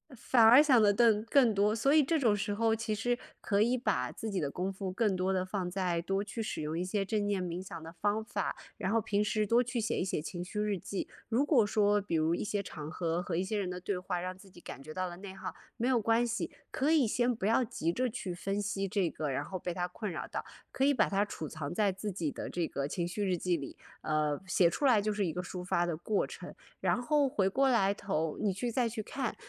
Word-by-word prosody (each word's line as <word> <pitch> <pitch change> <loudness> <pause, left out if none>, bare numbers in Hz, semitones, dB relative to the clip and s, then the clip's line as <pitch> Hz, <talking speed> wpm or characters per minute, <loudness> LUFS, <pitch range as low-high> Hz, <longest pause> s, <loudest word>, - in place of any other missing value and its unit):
反 235 +1 +2
而 245 +6 +9
想 260 -6 +5
得 205 -1 +5
更 220 -1 +4
更 245 -2 +4
多， 205 +2 +2
所 275 +6 +3
以 310 - +7
这 320 +4 +1
种 240 -8 +3
时 205 0 -1
候 225 +2 +2
其 225 -1 -1
实 245 +3 0 0.2
可 200 -1 +1
以 240 +4 +3
把 125 - 0
自 220 - -5
己 195 - -1
的 145 -4 -1
功 180 +6 -2
夫 195 0 -5
更 190 0 +1
多 185 +1 +1
地 185 -1 0
放 185 -1 -3
在 180 -2 -1
多 195 +3 -1
去 210 +3 -5
使 215 - -3
用 155 +2 -2
一 180 - -1
些 195 +2 0
正 205 +1 -1
念 200 -2 0
冥 175 0 -4
想 170 -3 -8
的 165 - -8
方 205 +5 -1
法， 205 -3 -2 0.2
然 190 - -2
后 225 - +3
平 205 0 0
时 210 0 +1
多 230 +4 +4
去 245 -1 -2
写 215 - -1
一 - - 0
写 185 - -1
情 175 +3 -5
绪 195 +4 -3
日 210 -3 0
记。 195 - -4 0.2
如 245 +5 +2
果 265 -8 +4
说 205 0 +3
比 195 -4 -3
如 160 +1 +2
一 - - -1
些 205 -1 -1
场 150 -5 -7
合 170 +1 -1
和 180 - -3
一 180 - +1
些 210 +3 -2
人 190 -3 -2
的 180 0 -5
对 185 0 -2
话， 180 -1 -3
让 185 +1 -5
自 195 +1 -16
己 175 - -16
感 135 - -8
觉 155 +3 -9
到 185 +1 -2
了 175 - -9
内 190 0 -8
耗， 195 - -6 0.2
没 245 +1 0
有 255 -2 +4
关 230 +2 +2
系， 235 0 -2 0.2
可 280 +4 +1
以 310 -5 +5
先 240 +2 +1
不 205 - -4
要 230 +4 +3
急 170 -8 -1
着 255 +7 0
去 205 -6 -5
分 195 +3 -2
析 195 -1 -2
这 195 -3 +1
个， 155 - -4
然 135 - -1
后 185 - -5
被 175 0 -3
它 180 +1 -2
困 210 +3 -5
扰 165 - -4
到， - - -4 0.3
可 265 - +1
以 285 - +4
把 255 - +2
它 200 +1 +2
储 160 -7 -6
藏 155 -2 -5
在 205 +1 +2
自 195 +2 -5
己 165 -5 -2
的 - - -6
这 175 -1 -1
个 140 0 -2
情 170 +3 -2
绪 200 +4 -2
日 180 - +2
记 175 0 0
里， 140 -3 -7 0.3
呃， 150 -1 0
写 175 -1 +4
出 285 - -2
来 240 -6 +5
就 215 +1 0
是 205 -1 0
一 165 - -2
个 180 - -2
抒 180 0 -6
发 175 -1 +1
的 170 -3 -2
过 200 +5 0
程。 - - -9 0.2
然 - - +1
后 290 +2 +3
回 195 -7 +1
过 270 +7 +2
来 200 -6 +3
头 165 -6 -2
你 205 -3 +1
去 235 +6 -2
再 245 0 +1
去 220 -1 -4
看， 260 +2 -3
200 Hz, 290 characters per minute, -31 LUFS, 180-225 Hz, 0.3 s, 而